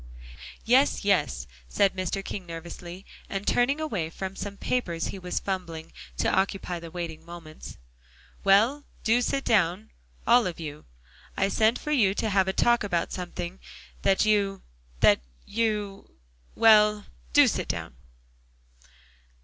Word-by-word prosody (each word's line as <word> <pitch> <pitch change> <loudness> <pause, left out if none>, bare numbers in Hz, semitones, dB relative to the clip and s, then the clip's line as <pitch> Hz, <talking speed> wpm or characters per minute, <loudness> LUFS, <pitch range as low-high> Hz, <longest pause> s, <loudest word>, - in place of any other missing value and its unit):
"Yes, 255 -2 +3
yes," 150 - +1 0.2
said 195 -1 +2
Mr. 185 +1 -3
King 190 -3 -6
nervously, 170 +2 -8 0.2
and 195 +1 -4
turning 260 +5 +2
away 205 - -2
from 190 +3 -6
some 200 0 -6
papers 175 -11 -2
he 195 - -6
was 180 -1 -4
fumbling 170 -4 -5 0.2
to - - +1
occupy 190 -2 -1
the 165 0 -9
waiting 165 -2 -6
moments. 165 -2 -10 0.7
"Well, 225 +9 +4 0.2
do 235 +2 +3
sit 275 +2 -1
down, 200 0 +1 0.3
all 240 -2 +5
of 175 - -6
you. 150 -2 -7 0.5
I 195 - +2
sent 220 +4 +3
for 300 - -5
you 210 -9 +3
to 220 0 -1
have 190 -1 +3
a - - +2
talk 240 +2 +3
about 175 -5 -1
something 180 0 -5 0.4
that 195 +2 +3
you 200 -2 +1 0.4
that - - +5 0.2
you 210 -2 -2 0.5
well, 210 -2 +5 0.3
do - - +7
sit - - -1
down." - - -4
195 Hz, 140 wpm, -27 LUFS, 175-220 Hz, 0.7 s, do